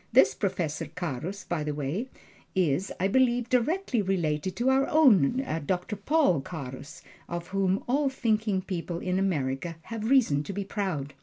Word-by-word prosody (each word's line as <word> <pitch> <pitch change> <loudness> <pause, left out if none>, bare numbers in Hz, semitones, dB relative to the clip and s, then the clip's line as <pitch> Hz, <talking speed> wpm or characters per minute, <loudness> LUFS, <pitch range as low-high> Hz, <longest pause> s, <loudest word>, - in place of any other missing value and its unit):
This 130 0 +6
Professor 170 -3 -2
Carus, 175 +3 -5
by 170 -3 -2
the 150 -1 -3
way, 150 - -3 0.5
is, 180 0 +1
I 190 - +2
believe, 245 +1 +2
directly 255 - +1
related 180 -3 -1
to 245 +2 +1
our 270 +1 +3
own 260 - +4 0.2
Doctor 185 +3 -1
Paul 205 - +2
Carus, 135 -3 -8 0.3
of 175 0 -5
whom 195 0 +1
all 275 +3 +2
thinking 215 -6 0
people 175 -2 -4
in 180 +2 -1
America 160 -4 -1
have 225 -1 -4
reason 225 - +4
to 200 - -5
be 200 +1 -2
proud. 185 -9 -3
190 Hz, 155 wpm, -28 LUFS, 160-230 Hz, 0.5 s, This